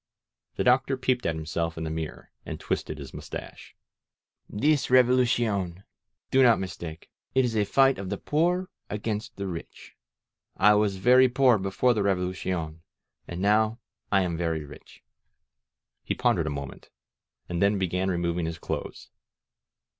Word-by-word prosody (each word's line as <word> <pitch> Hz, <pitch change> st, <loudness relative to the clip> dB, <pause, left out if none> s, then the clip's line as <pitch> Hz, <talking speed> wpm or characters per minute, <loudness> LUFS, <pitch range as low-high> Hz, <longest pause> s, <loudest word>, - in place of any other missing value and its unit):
The -, -, -1 dB
Doctor 130 Hz, +2 st, +3 dB
peeped 125 Hz, -3 st, 0 dB
at 80 Hz, -, 0 dB
himself 80 Hz, +1 st, -3 dB
in 80 Hz, -, -4 dB
the 80 Hz, -, -3 dB
mirror, 80 Hz, -1 st, -6 dB
and -, -, -6 dB
twisted 75 Hz, -, -3 dB
his 70 Hz, -3 st, -9 dB
mustache. -, -, -9 dB, 0.7 s
This 145 Hz, +5 st, +1 dB
Revolu 125 Hz, 0 st, +5 dB
cion. 100 Hz, -7 st, -1 dB, 0.5 s
Do 135 Hz, -, +5 dB
not 120 Hz, -3 st, +6 dB
mistake. 85 Hz, -3 st, -7 dB, 0.2 s
It 130 Hz, -1 st, +4 dB
is 115 Hz, -2 st, -2 dB
a 105 Hz, -1 st, +2 dB
fight 135 Hz, +2 st, +3 dB
of 95 Hz, -1 st, -5 dB
the -, -, -2 dB
poor 175 Hz, +4 st, 0 dB, 0.2 s
against 105 Hz, 0 st, -4 dB
the 100 Hz, -, -4 dB
rich. 85 Hz, -3 st, -8 dB, 0.6 s
I 105 Hz, -, +6 dB
was 105 Hz, -2 st, +2 dB
vei^ 125 Hz, +5 st, +5 dB
poor 125 Hz, -4 st, +4 dB
before 95 Hz, +6 st, +1 dB
the 110 Hz, -, 0 dB
Revolucion 90 Hz, -4 st, -2 dB, 0.5 s
and 85 Hz, +1 st, -5 dB
now 110 Hz, +2 st, +3 dB, 0.3 s
I 95 Hz, -1 st, +4 dB
am 90 Hz, -2 st, -1 dB
very 80 Hz, -3 st, -2 dB
rich." 70 Hz, -, -15 dB, 1.0 s
He -, -, -2 dB
pondered 80 Hz, -, +1 dB
a -, -, 0 dB
moment, 70 Hz, -2 st, -7 dB, 0.6 s
and 85 Hz, -1 st, -3 dB
then 100 Hz, +1 st, +3 dB
began 95 Hz, 0 st, -1 dB
removing 85 Hz, -1 st, -1 dB
his 80 Hz, 0 st, -4 dB
clothes. -, -, -6 dB
100 Hz, 155 wpm, -27 LUFS, 85-125 Hz, 1.0 s, not